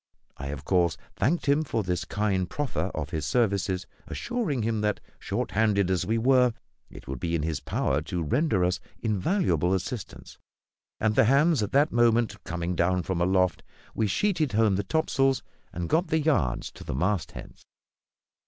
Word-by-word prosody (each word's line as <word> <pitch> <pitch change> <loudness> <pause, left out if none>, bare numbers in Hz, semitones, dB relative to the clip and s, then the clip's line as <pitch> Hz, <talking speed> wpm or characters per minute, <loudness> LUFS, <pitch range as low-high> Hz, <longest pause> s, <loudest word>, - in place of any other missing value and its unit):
I, 70 - -6
of 70 0 -6
course, 85 -5 +2 0.2
thanked 150 +12 +1
him 145 +2 +3
for 115 -7 -2
this 90 -1 -2
kind 95 -4 -1
proffer 145 -2 -2
of - - -4
his 80 - -2
services, 100 - 0 0.2
assuring 220 - -2
him 110 -1 0
that, 105 -1 0 0.2
short - - -3
handed 100 -3 +2
as 90 - 0
we 115 +2 +1
were, 125 0 +4 0.4
it - - -13
would 65 -1 -5
be 85 +4 -1
in 75 - -1
his 80 -2 -1
power - - -1
to 85 -2 -3
render 105 - +1
us 90 +1 0 0.2
invaluable 105 - +1
assistance; 100 +3 -6 0.6
and, 110 -1 +2
the 110 - +4
hands 140 +4 +4
at 105 - -2
that 145 +3 +4
moment 120 -1 +2
coming 85 +1 -3
down 90 +1 +1
from 90 -1 -2
aloft, 90 0 +2 0.3
we 110 - 0
sheeted 160 - 0
home 110 -2 +3
the 100 - -1
topsails, 135 +2 +1 0.3
and 85 0 -4
got 170 - +2
the 160 - +1
yards 85 - 0
to - - -12
the - - -4
mastheads. 90 +5 -3
105 Hz, 170 wpm, -27 LUFS, 90-130 Hz, 0.6 s, were